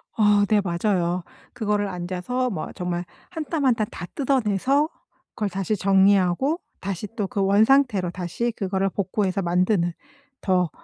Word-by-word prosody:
어. 205 Hz, -2 st, +4 dB
네 210 Hz, 0 st, +3 dB
맞아요. 175 Hz, -1 st, 0 dB, 0.3 s
그거를 210 Hz, -3 st, 0 dB
앉아서 185 Hz, +8 st, -2 dB
뭐 185 Hz, -8 st, -4 dB
정말 180 Hz, -1 st, -3 dB, 0.3 s
1 325 Hz, -4 st, -4 dB
땀 300 Hz, -4 st, -1 dB
1 250 Hz, -, +4 dB
땀 215 Hz, -, 0 dB
다 175 Hz, -, -6 dB
뜯어내서 270 Hz, -, +1 dB, 0.5 s
그걸 210 Hz, -3 st, -1 dB
다시 195 Hz, +3 st, -1 dB
정리하고 195 Hz, -, +3 dB, 0.2 s
다시 195 Hz, +1 st, -4 dB
또 205 Hz, -4 st, -1 dB
그 200 Hz, 0 st, -1 dB
원상태로 210 Hz, -2 st, +3 dB
다시 185 Hz, +7 st, -2 dB
그거를 195 Hz, 0 st, 0 dB
복구해서 195 Hz, 0 st, -1 dB
만드는, 175 Hz, 0 st, +1 dB, 0.5 s
더 180 Hz, -3 st, +2 dB
200 Hz, 275 characters per minute, -24 LUFS, 180-220 Hz, 0.5 s, 어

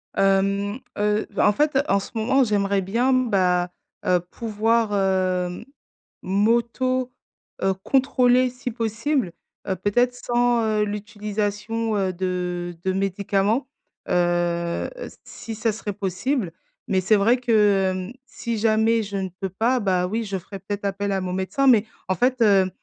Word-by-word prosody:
Hem, 200 Hz, +3 st, +1 dB, 0.2 s
heu, 210 Hz, +1 st, +1 dB
bah 205 Hz, -, +2 dB
en -, -, +6 dB
fait, 295 Hz, +3 st, +1 dB
en 200 Hz, -, +3 dB
ce -, -, -9 dB
moment, 245 Hz, +4 st, +2 dB
j'aimerais 200 Hz, -3 st, +1 dB
bien 235 Hz, +8 st, +1 dB
bah, 185 Hz, -8 st, +2 dB, 0.3 s
heu, 180 Hz, -1 st, +3 dB
pouvoir, 220 Hz, +4 st, 0 dB
heu, 185 Hz, -2 st, 0 dB, 0.6 s
m'auto, 235 Hz, +5 st, +1 dB, 0.5 s
heu, 190 Hz, 0 st, +3 dB
contrôler 255 Hz, -2 st, +3 dB
si 250 Hz, 0 st, -5 dB
possible, 225 Hz, -, -1 dB, 0.3 s
heu, 190 Hz, -, 0 dB
peut-être 205 Hz, +7 st, +1 dB
sans, 240 Hz, -1 st, +1 dB
heu, 215 Hz, -1 st, +1 dB
l'utilisation, 210 Hz, +1 st, -3 dB
heu, 190 Hz, -2 st, 0 dB
de 180 Hz, -1 st, -3 dB
de 190 Hz, -, +1 dB
médicaments, 200 Hz, +5 st, 0 dB, 0.4 s
heu, 175 Hz, -1 st, 0 dB
s -, -, -8 dB
si 225 Hz, -1 st, -8 dB
ça 225 Hz, +1 st, 0 dB
serait 210 Hz, -1 st, -5 dB
possible, 195 Hz, -, -2 dB, 0.3 s
mais 190 Hz, -1 st, +1 dB
c'est 205 Hz, +4 st, +4 dB
vrai 225 Hz, +5 st, +3 dB
que, 245 Hz, -1 st, -3 dB, 0.6 s
hem, -, -, -11 dB
si 235 Hz, -5 st, -4 dB
jamais 225 Hz, +1 st, +3 dB
je 200 Hz, -2 st, -4 dB
ne 190 Hz, -1 st, -2 dB
peux 190 Hz, -, -1 dB
pas, 235 Hz, +7 st, +1 dB
bah, 185 Hz, -3 st, +1 dB
oui 225 Hz, +5 st, -2 dB
je 195 Hz, -2 st, -3 dB
ferai 190 Hz, +2 st, -9 dB
peut-être 205 Hz, +1 st, -5 dB
appel 200 Hz, +1 st, -1 dB
à 190 Hz, -1 st, 0 dB
mon 180 Hz, 0 st, -3 dB
médecin 190 Hz, +9 st, -1 dB
mais 225 Hz, -5 st, +5 dB, 0.2 s
en 190 Hz, -, +1 dB
fait, 250 Hz, +7 st, +1 dB
heu, 195 Hz, -3 st, +4 dB
205 Hz, 150 wpm, -23 LUFS, 190-230 Hz, 0.6 s, en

